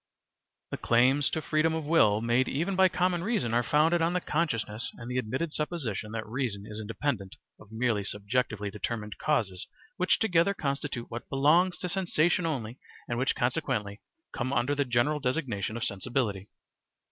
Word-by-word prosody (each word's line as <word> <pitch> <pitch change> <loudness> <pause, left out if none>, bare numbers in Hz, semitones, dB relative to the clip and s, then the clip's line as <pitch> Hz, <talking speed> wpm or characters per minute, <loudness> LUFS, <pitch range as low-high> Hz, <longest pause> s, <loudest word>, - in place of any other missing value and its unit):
The - - -3
claims 130 +4 +3
to 160 - -3
freedom 160 +2 +2
of 160 - -2
will 110 -10 +4
made 120 +3 +2
even 170 +8 -1
by 190 0 +5
common 180 -1 0
reason 180 - 0
are 120 - +4
founded 160 +6 +3
on 165 +2 +2
the 180 - +2
consciousness 115 -10 -2
and 120 +1 -7
the 125 - 0
admitted 130 +7 -2
supposition 135 - -2
that 110 -1 -3
reason 115 -4 -3
is 105 0 -7
independent 110 -2 -3 0.2
of 105 0 -16
merely 110 -2 0
subjectively 105 0 -2
determined 105 +1 -4
causes 105 -12 0 0.3
which 180 - +3
together 195 -2 +2
constitute 140 -5 -3
what 120 +1 -6
belongs 160 +7 +3
to 180 - -4
sensation 175 -2 +1
only 125 -5 -4 0.3
and 120 0 -2
which 130 - +1
consequently 125 -6 -1 0.3
come 130 +1 -2
under 125 +1 +1
the 140 -1 +1
general 125 +5 +1
designation 125 - -2
of 115 - -3
sensibility. 100 -1 -2
130 Hz, 165 wpm, -29 LUFS, 110-160 Hz, 0.3 s, by